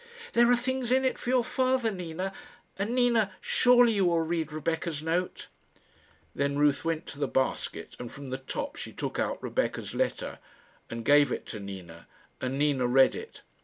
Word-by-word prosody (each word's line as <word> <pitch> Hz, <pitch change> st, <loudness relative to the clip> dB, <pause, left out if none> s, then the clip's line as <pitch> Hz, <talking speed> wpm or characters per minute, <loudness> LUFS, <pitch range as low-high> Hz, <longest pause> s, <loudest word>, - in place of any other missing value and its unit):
"There 235 Hz, 0 st, +5 dB
are 245 Hz, -, +6 dB
things 250 Hz, 0 st, -2 dB
in 265 Hz, +1 st, +3 dB
it 260 Hz, -, 0 dB
for -, -, -4 dB
your 255 Hz, -1 st, +3 dB
father, 255 Hz, -2 st, +1 dB
Nina; 180 Hz, 0 st, -4 dB, 0.4 s
and, 205 Hz, +5 st, -2 dB
Nina, 235 Hz, -6 st, +3 dB
surely 245 Hz, -1 st, +5 dB
you 200 Hz, -3 st, +2 dB
will 170 Hz, -1 st, +3 dB
read 160 Hz, -1 st, -2 dB
Rebecca's 160 Hz, 0 st, -2 dB
note?" 170 Hz, +3 st, -2 dB, 0.9 s
Then 140 Hz, 0 st, 0 dB
Ruth 145 Hz, -1 st, +3 dB
went 165 Hz, 0 st, -1 dB
to 145 Hz, -, -9 dB
the 140 Hz, -, +1 dB
basket, 130 Hz, 0 st, -2 dB
and 120 Hz, -1 st, -6 dB
from 135 Hz, -2 st, -9 dB
the 130 Hz, -, -3 dB
top 135 Hz, -, -5 dB
she -, -, -6 dB
took -, -, -4 dB
out -, -, -2 dB
Rebecca's -, -, -2 dB
letter, -, -, -2 dB, 0.5 s
and 115 Hz, -1 st, -6 dB
gave 145 Hz, +1 st, +5 dB
it -, -, -3 dB
to 110 Hz, -, -5 dB
Nina, 95 Hz, -4 st, -9 dB, 0.3 s
and 130 Hz, +1 st, -2 dB
Nina 140 Hz, -4 st, +2 dB
read 130 Hz, +2 st, +5 dB
it. 455 Hz, -, -9 dB
165 Hz, 180 wpm, -28 LUFS, -, 0.9 s, are